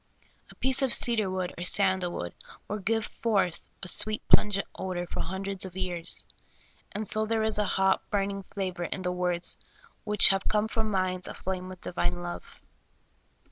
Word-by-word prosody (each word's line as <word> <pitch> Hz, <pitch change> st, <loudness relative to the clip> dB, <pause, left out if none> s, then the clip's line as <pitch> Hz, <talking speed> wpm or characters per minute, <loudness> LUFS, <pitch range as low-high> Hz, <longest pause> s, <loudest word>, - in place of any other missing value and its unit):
A -, -, -14 dB
piece 265 Hz, +1 st, +1 dB
of 265 Hz, -2 st, +2 dB
cedar 230 Hz, -5 st, +4 dB
wood 185 Hz, -1 st, -3 dB
or -, -, -3 dB
sandal 185 Hz, -1 st, +3 dB
wood 85 Hz, -, -5 dB, 0.3 s
will 210 Hz, -, -3 dB
give 225 Hz, +3 st, 0 dB
forth 200 Hz, -7 st, -1 dB
a -, -, -5 dB
sweet, 215 Hz, +3 st, +2 dB
pungent 200 Hz, -1 st, +4 dB
odor 180 Hz, -2 st, -4 dB
for -, -, -6 dB
hundreds 190 Hz, +1 st, -3 dB
of 190 Hz, -1 st, -8 dB
years; 175 Hz, -2 st, -2 dB, 0.7 s
and 215 Hz, +1 st, -4 dB
so 215 Hz, +1 st, +2 dB
there 220 Hz, 0 st, 0 dB
is 220 Hz, -1 st, +2 dB
a 210 Hz, -, +2 dB
hot, 190 Hz, 0 st, +1 dB
burning 200 Hz, -1 st, -1 dB
flavor 185 Hz, -3 st, -3 dB
in 185 Hz, -, -4 dB
the 180 Hz, -, 0 dB
words 180 Hz, -1 st, 0 dB, 0.4 s
which 210 Hz, -1 st, +7 dB
have 195 Hz, 0 st, 0 dB
come 215 Hz, 0 st, +1 dB
from 220 Hz, -1 st, -1 dB
minds 185 Hz, -2 st, -1 dB
aflame 185 Hz, 0 st, -5 dB
wdth 185 Hz, -1 st, -10 dB
divine 90 Hz, 0 st, -2 dB
love. 85 Hz, 0 st, -8 dB
190 Hz, 175 wpm, -28 LUFS, 180-210 Hz, 0.7 s, which